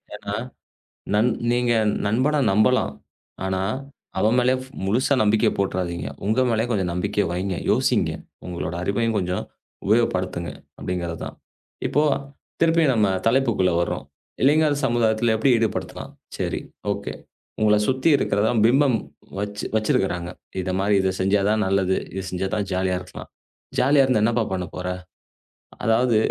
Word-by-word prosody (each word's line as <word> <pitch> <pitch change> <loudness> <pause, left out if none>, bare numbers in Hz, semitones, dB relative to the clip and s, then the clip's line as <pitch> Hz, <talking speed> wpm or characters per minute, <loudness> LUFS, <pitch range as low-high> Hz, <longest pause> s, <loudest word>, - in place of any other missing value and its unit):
ஏன்னா, 100 - -5 0.8
நண் 110 +4 +4 0.2
நீங்க 120 0 +2 0.3
நண்பன 130 +8 +2
நம்பலாம். 110 +6 +3 0.5
ஆனா, 95 0 -1 0.6
அவன் 110 +5 +3
மேல 125 +1 +3
ஃப்- 130 - -12 0.2
முழுசா 125 +8 +2
நம்பிக்கை 105 0 +3
போட்டுறாதீங்க. 90 -5 -2 0.2
உங்க 110 +5 +2
மேல 115 0 +1
கொஞ்சம் 95 -5 0
நம்பிக்கை 100 +3 0
வைங்க. 95 +2 -2 0.2
யோசிங்க. - - +2 0.3
உங்களோட 85 -2 -4
அறிவையும் 115 +4 0
கொஞ்சம் 90 -1 -1 0.4
உபயோகப்படுத்துங்க 95 -5 +1 0.3
அப்படிங்கறது 85 -2 -3
தான். - - -8 0.5
இப்போ 150 - +2 0.6
திருப்பியும் 165 -4 +4
நம்ம 105 -3 +3 0.2
தலைப்புக்குள்ள 115 -7 +2
வர்றோம். 70 -5 -3 0.4
இளைஞர் 150 +2 +4
சமுதாயத்தில 115 -2 +2
எப்படி 110 +5 +2
ஈடுபடுத்தலாம்? 110 -2 -3 0.3
சேரி, - - -2 0.3
ஓகே! - - -4 0.5
உங்கள 105 -1 +5
சுத்தி 130 +4 +2
இருக்கிறதான் 110 +2 +1
பிம்பம் 130 0 +4 0.4
வச் 100 0 -4
வச்சிருக்காங்க. 90 -5 0 0.3
இந்த 95 0 -2
மாதிரி 100 +1 +2
இத 95 0 +1
செஞ்சா 95 +2 +2
தான் 110 0 +2
நல்லது, 95 -1 +2 0.2
இத 95 - -3
செஞ்சா 95 +1 -2
தான் 100 -2 -1
ஜாலியா 95 0 0
இருக்கலாம். 90 - -10 0.5
ஜாலியா 140 +2 +5
இருந்து, 125 -5 +2
என்னப்பா 115 +1 +2
பண்ண 90 -1 -2
போற? 90 0 -4 1.0
அதாவது 115 +1 +3
105 Hz, 130 wpm, -23 LUFS, 95-120 Hz, 1.0 s, உங்கள